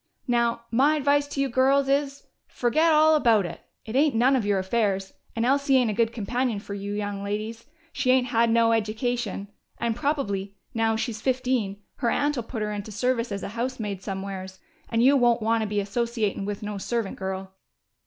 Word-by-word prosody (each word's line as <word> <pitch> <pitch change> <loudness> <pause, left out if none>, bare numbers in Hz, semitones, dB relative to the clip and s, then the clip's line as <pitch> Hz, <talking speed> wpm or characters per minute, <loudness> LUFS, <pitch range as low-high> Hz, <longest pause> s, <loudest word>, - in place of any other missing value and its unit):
Now, 235 -1 +1
my 275 +6 +4
advice 285 0 +2
to 285 - -5
you 275 - +2
girls 270 +2 +3
is: 275 0 0 0.2
fergit 310 +7 +2
all 310 0 +6
about 230 -10 +4
it! - - -7 0.2
It 220 - -6
ain't 285 -1 +3
none 255 +4 +4
of 230 -6 0
your 205 -1 +2
affairs, 195 -1 0 0.2
and 230 0 0
Elsie 275 +1 +3
ain't 245 -4 +2
a - - -2
good 225 +1 +1
companion 240 0 -1
fer 200 - -8
you 200 0 -4
young 205 -1 -3
ladies. 215 +3 -4 0.3
She 280 -2 -1
ain't 255 -1 +4
had 230 0 +3
no 230 0 +4
eddication, 220 -2 -1 0.3
and 230 -1 -1
probably, 200 -9 -2 0.2
now 225 -1 +1
she's 220 -1 -3
fifteen, 250 -6 -1
her 235 - 0
aunt'll 290 -1 0
put 225 -1 -5
her 210 - -2
into 205 +1 -5
service 235 +2 0
as 200 0 -4
a - - -4
housemaid 225 -4 -3
somewheres. 190 -1 -6 0.3
And 230 0 +2
you 275 +3 +6
won't 240 -3 +3
want 225 +1 +2
to 215 - -1
be 210 - -2
associatin' 210 0 -1
with 205 0 -4
no 205 -1 -4
servant 230 0 -2
girl!" 190 0 -4
230 Hz, 195 wpm, -25 LUFS, 205-255 Hz, 0.3 s, all